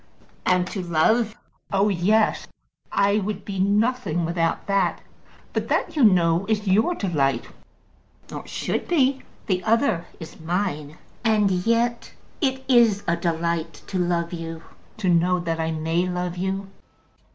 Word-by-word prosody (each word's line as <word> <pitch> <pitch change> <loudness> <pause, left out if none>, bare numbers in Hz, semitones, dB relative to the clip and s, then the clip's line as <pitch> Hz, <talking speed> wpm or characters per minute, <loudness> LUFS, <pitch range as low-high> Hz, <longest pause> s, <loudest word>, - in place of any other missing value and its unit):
"And 180 -1 +3
to 195 - -4
love." 210 +7 +2 0.4
"Oh, 200 +1 +3
yes. 210 +4 +2 0.4
I 200 +1 +3
would 205 0 -4
be 195 -2 -4
nothing 200 -3 +1
without 165 0 -1
that. 195 -3 +1 0.5
But - - -1
that, - - 0
you 290 - +3
know, 175 -3 +4
is 215 -1 0
your 220 - +3
delight, 140 - 0 0.8
or - - -7
should - - -3
be. 275 -5 +2 0.2
The 185 -2 0
other 220 -6 +1
is 160 - -10
mine. 160 -3 -2 0.3
And 215 -3 +3
yet 230 +6 0 0.3
it 265 -2 0
is 235 -6 +4
a 170 - +2
delight 170 -1 -2
to 190 - -3
love 175 -1 0
you; 165 -1 -6 0.3
to 210 -4 -2
know 180 +1 +3
that 165 -2 -3
I 160 0 0
may 165 +3 0
love 180 0 -3
you." 190 +2 -2
185 Hz, 140 wpm, -23 LUFS, 170-215 Hz, 0.8 s, know